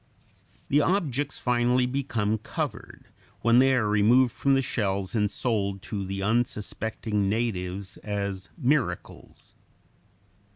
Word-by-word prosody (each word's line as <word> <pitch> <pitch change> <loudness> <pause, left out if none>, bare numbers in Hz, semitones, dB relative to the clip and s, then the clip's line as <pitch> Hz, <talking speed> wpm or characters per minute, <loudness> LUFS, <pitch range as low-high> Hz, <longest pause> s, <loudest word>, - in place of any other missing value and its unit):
The 145 +2 +4
objects 145 -6 0
finally 125 +1 +2
become 115 -5 -1
covered, - - -6 0.3
when 120 +1 +5
they 135 0 +5
are 115 -4 +1
removed 115 +5 +4
from 135 +3 +2
the 135 - +2
shells 100 -6 -2
and 105 -3 +1
sold 100 -5 -1
to 100 -3 -4
the 95 +1 -4
unsuspecting 110 -2 -1
natives 100 -4 -2
as 100 -2 -4
"miracles." 145 -3 -2
110 Hz, 115 wpm, -26 LUFS, 100-125 Hz, 0.3 s, when